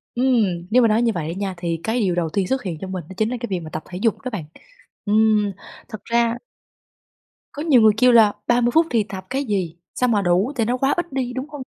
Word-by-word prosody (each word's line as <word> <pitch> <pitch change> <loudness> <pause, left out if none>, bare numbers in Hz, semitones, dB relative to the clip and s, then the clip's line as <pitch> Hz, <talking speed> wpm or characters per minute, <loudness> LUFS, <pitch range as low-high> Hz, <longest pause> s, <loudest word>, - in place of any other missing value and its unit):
Ừm, 215 -9 +1
nếu 250 +2 +5
mà 230 - +5
nói 220 +2 +2
như 235 -1 +2
vậy 155 -2 -3
đó - - -9
nha, 195 -2 -3
thì 170 -2 -3
cái 230 +3 -1
điều 185 -5 +1
đầu 165 -2 -1
tiên 190 +1 -1
xuất 265 0 -1
hiện 170 -5 -4
trong 190 0 -6
mình 185 -2 -4
đó - - -8
chính 220 +1 +1
là 250 - -3
cái 240 - -4
việc 185 -2 -1
mà 160 -2 -9
tập 155 0 -6
thể 180 - -6
dục 225 -3 +1
đó 255 - -4
bạn. 180 -8 -5 0.6
Ừm, 210 -1 +3 0.4
thật 215 -3 -7
ra 235 0 +1 1.2
Có 290 - -6
nhiều 270 -8 +5
người 215 -1 +7
kêu 250 +1 +5
là 220 -3 +6
30 240 0 +3
phút 325 +1 +5
thì 230 -3 +2
tập 190 -2 -8
cái 270 +2 -1
gì, 190 - -2 0.2
sao 250 -1 +1
mà 210 -3 +2
đủ 185 +8 +1
tại 230 -3 0
nó 245 +2 0
quá 270 +2 +1
ít 345 -5 -3
đi, 250 -2 -2
đúng 260 +4 -5
hông? 290 -2 -8
220 Hz, 265 wpm, -21 LUFS, 185-250 Hz, 1.2 s, người